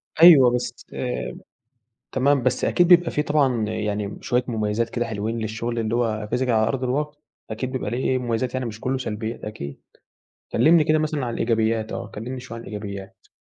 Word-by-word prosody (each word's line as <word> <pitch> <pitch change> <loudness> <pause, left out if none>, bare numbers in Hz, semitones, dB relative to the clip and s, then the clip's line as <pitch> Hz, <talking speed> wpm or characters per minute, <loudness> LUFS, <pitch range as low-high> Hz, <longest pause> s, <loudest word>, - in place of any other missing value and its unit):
أيوه 155 -7 +9
بس 125 - -4 1.3
تمام، 135 0 +2
بس 130 0 +1
أكيد 175 - +3
بيبقى 175 -1 +6
في 150 - 0
طبعًا 135 -7 +2
يعني 105 -2 -3
شويّة 125 0 +1
مُميزات 110 0 -1
كده 120 0 -2
حلوين 110 0 -3
للشغل 115 +2 -3
اللي 110 0 -1
هو 110 -3 -1
physical 125 +1 +1
على 110 -2 +3
أرض 130 +1 -1
الواقع، 145 +4 -1 0.3
أكيد 125 +4 -3
بيبقى 130 -5 -3
ليه 125 +3 -2
إيه، 130 - +2
مُميزات 120 0 -2
يعني، 130 -1 -2
مش 110 -2 -6
كلّه 130 +3 -1
سلبيات 110 -2 -4
أكيد، 70 -10 -7 0.7
كلّمني 155 +7 +5
كده 155 +1 +3
مثلًا 155 -3 -1
على 120 - -3
الإيجابيات، 115 -1 0
آه، 115 - -4
كلّمني 125 +5 -6
شويّة 125 -2 -8
عن - - -8
الإيجابيات. 100 -2 -8
120 Hz, 180 wpm, -23 LUFS, 110-130 Hz, 1.3 s, أيوه